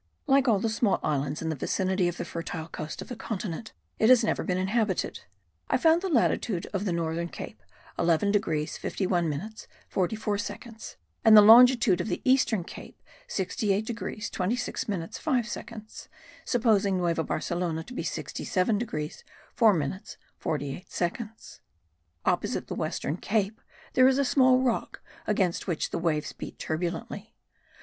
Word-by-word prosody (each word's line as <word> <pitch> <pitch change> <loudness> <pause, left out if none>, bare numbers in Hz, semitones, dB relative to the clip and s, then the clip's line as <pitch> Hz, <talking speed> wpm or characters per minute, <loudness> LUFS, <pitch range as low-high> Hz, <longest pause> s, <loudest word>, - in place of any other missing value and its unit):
Like 270 0 +4
all 225 -4 +5
the 225 - 0
small 220 -2 +1
islands 145 0 -1
in 160 - -1
the 160 - -1
vicinity 185 +5 0
of 175 0 -3
the - - -4
fertile 165 -1 -5
coast 155 -2 -6
of - - -15
the 245 - -6
continent 215 -1 -5 0.3
it 220 - +4
has 250 -2 +7
never 220 - 0
been 180 -2 -1
inhabited. 195 +1 0 0.5
I - - +3
found 325 +5 +4
the 380 - -2
latitude 225 - +1
of 195 +1 -1
the 190 - 0
northern 170 0 -1
cape - - -8 0.4
11 170 +4 +3
degrees 160 -8 0
51 180 -4 0
minutes 210 +10 -6 0.2
44 205 +2 -1
seconds 225 +2 -7 0.3
and 220 -1 +8
the 210 - +10
longitude 235 -4 +7
of - - -4
the 180 - -3
eastern 255 -7 +3
cape - - -11 0.3
68 200 +2 -1
degrees 215 -2 -5
26 235 +7 -2
minutes 175 -6 -4
5 255 -7 0
seconds 220 -1 -8 0.4
(supposing 210 -5 +2
Nueva 170 -2 0
Barcelona 170 0 -2
to 245 - -11
be - - -3
67 200 +3 -1
degrees 155 -10 -4 0.3
4 230 -3 +5
minutes 170 +1 -3 0.2
48 145 +3 -4
seconds). 215 +5 -4 0.6
Opposite - - 0
the - - -6
western 155 - -2
cape 210 +2 -1 0.3
there 255 0 +6
is 265 0 +3
a 280 - +2
small 255 0 +4
rock 245 -3 -1 0.2
against 190 -5 0
which 170 -4 -1
the - - -2
waves 155 -3 -1
beat - - -8
turbulently. 180 +7 -4
200 Hz, 155 wpm, -27 LUFS, 170-230 Hz, 0.6 s, the